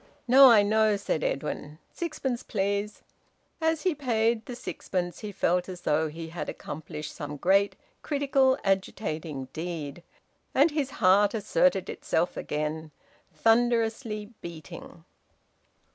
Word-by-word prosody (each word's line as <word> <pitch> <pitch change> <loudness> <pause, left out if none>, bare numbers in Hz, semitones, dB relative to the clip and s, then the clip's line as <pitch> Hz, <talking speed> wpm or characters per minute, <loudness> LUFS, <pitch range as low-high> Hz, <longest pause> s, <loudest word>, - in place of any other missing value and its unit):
"No, 265 +2 +9
I 215 -4 +7
know," 215 0 +3
said 195 -5 -2
Edwin. 150 +1 -3 0.2
"Sixpence, 290 -7 -3
please." 200 +1 -2 0.6
As 320 -1 +1
he 370 - +2
paid 230 -5 0
the 245 - -5
sixpence 180 -6 -4
he 210 -2 -6
felt 180 -1 0
as 180 -1 -7
though 155 0 +1
he 165 +2 -7
had 170 -1 -5
accomplished 150 0 -7
some 145 0 -6
great, 195 +6 +3 0.3
critical, 275 -2 +2
agitating 160 -8 -2
deed. 160 -2 -5 0.5
And 295 +4 +5
his 295 -3 -1 0.2
heart 200 +3 +5
asserted - - +2
itself - - -1
again, 155 +1 -3 0.4
thunderously 225 -1 +1
beating. 165 -3 -10
205 Hz, 120 wpm, -27 LUFS, 160-240 Hz, 0.6 s, No